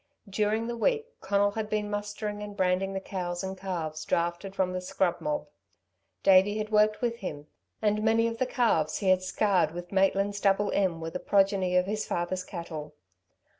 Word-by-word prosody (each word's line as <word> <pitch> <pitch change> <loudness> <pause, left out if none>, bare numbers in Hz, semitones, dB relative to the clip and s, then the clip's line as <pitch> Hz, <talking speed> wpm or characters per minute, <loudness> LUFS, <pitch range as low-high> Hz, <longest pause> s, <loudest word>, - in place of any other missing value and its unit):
During 210 +3 0
the 240 0 -3
week 450 - +1 0.2
Conal 200 +1 +2
had 215 0 -4
been 210 -1 -1
mustering 205 0 -4
and 205 -1 -7
branding 190 +1 +1
the 190 - -2
cows 180 -2 -4
and 190 0 -4
calves 165 -5 -4
drafted 175 +3 -1
from 185 -1 0
the 185 - -2
scrub 180 -1 0
mob. 295 0 -2 0.8
Davey 195 +2 +5
had 215 0 -3
worked 215 +2 +3
with 235 -1 0
him, 150 -8 -6 0.4
and 210 0 +2
many 225 +1 +3
of 230 0 -2
the 255 - +1
calves 195 -12 +1
he 195 - 0
had 185 0 +4
scarred 185 -3 +1
with 175 0 -7
Maitland's 195 +1 +2
double 200 +1 +2
M. 185 -4 +1
were 165 0 -4
the 180 - -4
progeny 195 -2 +2
of 180 - +3
his 210 +2 -2
father's 180 +2 -2
cattle. 160 -5 -7
195 Hz, 185 wpm, -28 LUFS, 180-210 Hz, 0.8 s, Davey